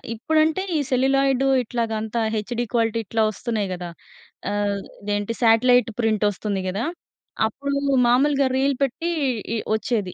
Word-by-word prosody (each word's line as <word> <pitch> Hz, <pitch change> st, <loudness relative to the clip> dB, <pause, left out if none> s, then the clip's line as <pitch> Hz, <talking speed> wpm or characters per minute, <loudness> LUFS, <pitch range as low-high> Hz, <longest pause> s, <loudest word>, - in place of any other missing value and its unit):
ఇప్పుడంటే 315 Hz, -, +1 dB
ఈ -, -, +1 dB
సెల్యులాయిడు 270 Hz, +1 st, +2 dB, 0.2 s
ఇట్లాగ 230 Hz, -1 st, -2 dB
అంతా, 220 Hz, +1 st, -2 dB
హెచ్‍డీ 240 Hz, +3 st, -2 dB
క్వాలిటీ 230 Hz, -1 st, +1 dB
ఇట్లా 220 Hz, +3 st, 0 dB
వస్తున్నాయి 215 Hz, -2 st, -3 dB
కదా! 175 Hz, -1 st, -6 dB, 0.6 s
ఆహ్, 205 Hz, -1 st, 0 dB, 0.2 s
ఇదేంటి 205 Hz, +2 st, -2 dB
శాటిలైట్ 245 Hz, +2 st, +4 dB
ప్రింటొస్తుంది 205 Hz, -2 st, 0 dB
గదా! 205 Hz, +8 st, -2 dB, 0.6 s
అప్పుడూ 280 Hz, +5 st, -3 dB, 0.3 s
మామూలుగా 275 Hz, +2 st, +3 dB
రీల్ 275 Hz, -1 st, +1 dB
పెట్టి, 300 Hz, +6 st, -2 dB, 0.5 s
ఇ -, -, 0 dB, 0.2 s
వొచ్చేది. 215 Hz, -3 st, -1 dB
230 Hz, 125 wpm, -23 LUFS, 210-270 Hz, 0.6 s, శాటిలైట్